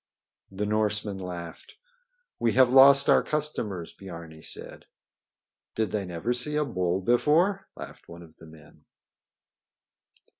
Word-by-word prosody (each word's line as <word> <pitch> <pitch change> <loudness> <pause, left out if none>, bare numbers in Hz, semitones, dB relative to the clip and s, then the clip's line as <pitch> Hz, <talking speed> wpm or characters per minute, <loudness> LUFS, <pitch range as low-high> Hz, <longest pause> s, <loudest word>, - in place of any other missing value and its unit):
The 95 +2 -4
Norsemen 105 -1 -1
laughed. 85 -2 -9 0.6
"We 115 -2 +1
have 130 -1 +4
lost 135 +1 +7
our - - +5
customers," 110 - -3
Biarni 85 -4 -11
said. - - -6 0.9
"Did 110 -4 -1
they 105 -2 -2
never 90 +7 -3
see 125 +5 0
a 150 0 +1
bull 90 -6 -2
before?" 165 - +1
laughed - - -11
one 85 +1 -11
of 80 -1 -18
the 80 - -15
men. 75 -1 -18
105 Hz, 125 wpm, -26 LUFS, 85-130 Hz, 0.9 s, lost